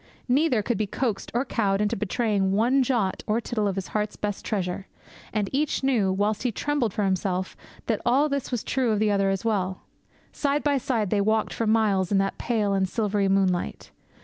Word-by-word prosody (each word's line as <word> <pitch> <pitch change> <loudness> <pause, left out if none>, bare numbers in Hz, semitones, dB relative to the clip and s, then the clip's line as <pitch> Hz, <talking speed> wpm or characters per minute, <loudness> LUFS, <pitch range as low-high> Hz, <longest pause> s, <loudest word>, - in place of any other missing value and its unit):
Neither 255 -3 +2
could 235 +1 -1
be 215 - 0
coaxed 225 -1 -2
or 245 +3 +1
cowed 200 -6 0
into 210 +2 +1
betraying 205 -1 0
one 240 +7 +3
jot 235 -7 0
or 215 +1 +2
tittle 220 -3 -1
of 195 - -1
his 195 -1 -4
heart's 210 0 -2
best 205 -1 -4
treasure. 190 -2 -3 0.4
And 210 -2 0
each 290 0 0
knew, 230 -8 +2
whilst 205 +2 0
he 245 - 0
trembled 290 -2 -1
for 210 - -1
himself, 185 -1 -1 0.3
that - - -1
all 270 +5 +3
this 280 -2 -2
was 245 -4 -2
true 255 -2 0
of 215 - +2
the 210 0 +2
other 195 -1 +2
as 195 +3 -2
well. 190 -4 -1 0.5
Side 285 0 0
by 285 -2 +2
side 225 -6 -1
they 205 - +2
walked 215 +1 +1
for 230 - -1
miles 210 -4 +2
in 200 - +3
that 195 0 0
pale 215 -4 0
and 190 -1 +1
silvery 205 -2 0
moonlight. 190 -2 0
215 Hz, 200 wpm, -25 LUFS, 195-240 Hz, 0.5 s, one